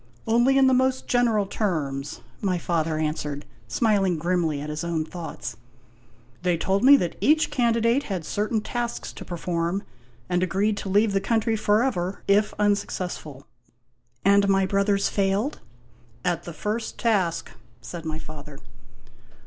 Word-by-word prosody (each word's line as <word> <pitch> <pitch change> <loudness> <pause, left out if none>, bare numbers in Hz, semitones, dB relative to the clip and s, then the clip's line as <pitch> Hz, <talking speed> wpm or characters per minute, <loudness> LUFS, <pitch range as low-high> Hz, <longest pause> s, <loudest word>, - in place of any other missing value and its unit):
" - - -31
Only 240 +4 +4
in 270 - +6
the 260 - +5
most 260 0 +2
general 230 -4 +2
terms," 150 -9 -2 0.2
my 185 -3 +1
father 165 -2 -1
answered, 150 -2 -3 0.2
smiling 200 -6 +2
grimly 165 -2 0
at 150 +1 -5
his 150 +1 -4
own 165 -2 -1
thoughts. 155 -9 -7 0.4
" 115 +1 -31
They 180 -1 +1
told 195 +5 0
me 280 +2 +9
that 175 -7 -2
each 310 +2 +3
candidate 235 +1 +2
had 185 -5 -3
certain 210 +4 -1
tasks 240 +1 -4
to - - -9
perform, 175 +2 -2 0.4
and 180 0 0
agreed 195 +4 +1
to 195 - -5
leave 205 +2 +3
the 195 - +2
country 225 +2 +1
for 215 +1 +2
ever 190 -7 -2
if 210 +2 +3
unsuccessful." 180 -8 -2 0.8
"And 200 0 +5
my 195 0 +3
brothers 200 +1 +2
failed?' 200 +7 0 0.4
" 115 +7 -25
At - - -8
the 170 - -6
first 215 +7 -3
task," 195 -8 0 0.3
said 170 -2 -8
my 155 -1 -3
father. 150 -2 -10
195 Hz, 155 wpm, -25 LUFS, 160-215 Hz, 0.8 s, me